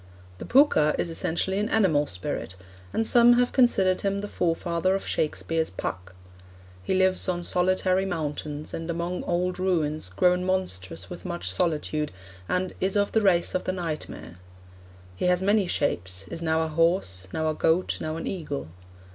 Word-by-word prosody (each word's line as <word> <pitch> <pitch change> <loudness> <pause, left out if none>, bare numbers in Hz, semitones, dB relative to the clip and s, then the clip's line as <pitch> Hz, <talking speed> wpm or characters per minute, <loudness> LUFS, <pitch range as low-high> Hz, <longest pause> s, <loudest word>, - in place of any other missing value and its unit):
The - - -6
Pooka 240 - +4
is 170 - -1
essentially 180 +4 -1
an 210 +2 -1
animal 165 -10 +3
spirit, 90 0 -4 0.4
and 225 - 0
some 240 +1 +6
have 245 0 +2
considered 195 -8 +3
him 200 0 -1
the 205 - -4
forefather 170 +1 0
of 195 - -3
Shakespeare's 160 +1 -1
'Puck.' 95 0 -6 0.7
He 95 - -1
lives 185 0 +2
on 175 -1 -1
solitary 185 +1 +2
mountains, 150 -3 -4
and 165 +1 -5
among 170 +2 -2
old 180 +1 -1
ruins 155 - 0
'grown 180 - +2
monstrous 95 - -1
with - - -8
much 175 -2 -3
solitude,' 155 -3 0 0.4
and 180 0 -1
'is 190 +1 +1
of 205 0 +2
the 220 - +2
race 180 -4 +3
of 185 - -1
the 185 - -1
nightmare.' 155 - -5 0.8
'He - - -1
has 180 +1 +2
many 205 -1 +3
shapes 95 - -2
is 165 - -6
now 160 -1 +1
a - - -1
horse,... 155 - 0
now 160 0 -1
a 155 - +1
goat, 165 +4 +1
now 155 0 -3
an - - -5
eagle. 145 - -4
175 Hz, 165 wpm, -26 LUFS, 150-185 Hz, 0.8 s, some